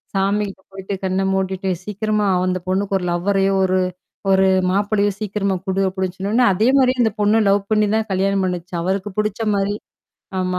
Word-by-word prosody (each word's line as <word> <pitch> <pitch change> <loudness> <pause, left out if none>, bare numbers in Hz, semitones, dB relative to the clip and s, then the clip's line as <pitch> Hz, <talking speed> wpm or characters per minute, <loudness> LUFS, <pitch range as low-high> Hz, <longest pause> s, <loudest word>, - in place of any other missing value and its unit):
சாமிகிட்ட 195 0 0
போயிட்டு 195 +1 -6
கண்ண 190 0 0
மூடிட்டு 190 0 -1 0.2
சீக்கிரமா 210 0 -1 0.2
அந்த 185 0 0
பொண்ணுக்கு 195 +1 0
ஒரு 180 - -5
லவ்வரையோ 195 +2 +1
ஒரு 185 0 +1 0.5
ஒரு 190 0 +4 0.2
மாப்பளையோ 205 +2 +1
சீக்கிரமா 200 -2 -1
குடு 190 0 0
அப்டின்னு 190 -1 -3
சொன்னோனே, 210 +6 +1
அதே 215 +5 +2
மாரியே 255 -1 +3
அந்த 220 -2 +3
பொண்ணு 210 +1 +3
லவ் 200 +1 +4
பண்ணி 215 -1 +3
தான் 220 0 0
கல்யாணம் 195 +1 +1
பண்ணுச்சு. 180 -1 -4
அவருக்கு 190 +3 -1
புடிச்ச 210 +1 -1
மாரி. 200 +1 0 0.6
ஆமா. 185 0 -1
195 Hz, 165 wpm, -20 LUFS, 190-210 Hz, 0.6 s, ஒரு